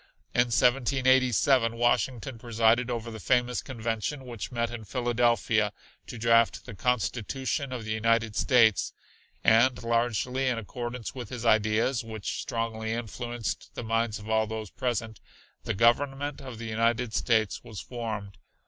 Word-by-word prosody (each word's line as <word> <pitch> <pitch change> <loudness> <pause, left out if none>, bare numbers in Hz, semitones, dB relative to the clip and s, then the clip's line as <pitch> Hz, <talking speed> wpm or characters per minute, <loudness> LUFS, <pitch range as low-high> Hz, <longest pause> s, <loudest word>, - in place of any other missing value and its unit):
In 120 - +4
1787 130 -1 +3
Washington 120 +1 0
presided 115 +1 +2
over 115 -1 -3
the 110 - -7
famous 125 +1 +1
convention 120 +2 -3
which 120 -4 -6
met 115 -1 -1
in 120 -2 -6
Philadelphia 115 -2 +1 0.4
to 125 - -7
draft 115 0 +3
the - - -8
Constitution 125 - -1
of 120 -4 -5
the 110 - -4
United 115 0 +1
States, 115 -5 +3 0.5
and 120 +3 +4
largely 120 +2 0
in 125 -2 +1
accordance 120 +2 -5
with 125 -5 -7
his 120 -2 -6
ideas, 110 +3 +2
which 110 -2 -5
strongly 115 -2 -3
influenced 120 +1 -5
the - - -5
minds 115 0 0
of 105 +1 -11
all 110 0 +2
those 110 -1 -5
present, 110 -3 -3 0.5
the - - -1
Government 135 +6 +2
of 130 -4 -8
the 115 - -7
United 115 +1 0
States 110 -4 +1
was 110 -3 -8
formed. 110 -5 -6
115 Hz, 140 wpm, -28 LUFS, 110-125 Hz, 0.5 s, In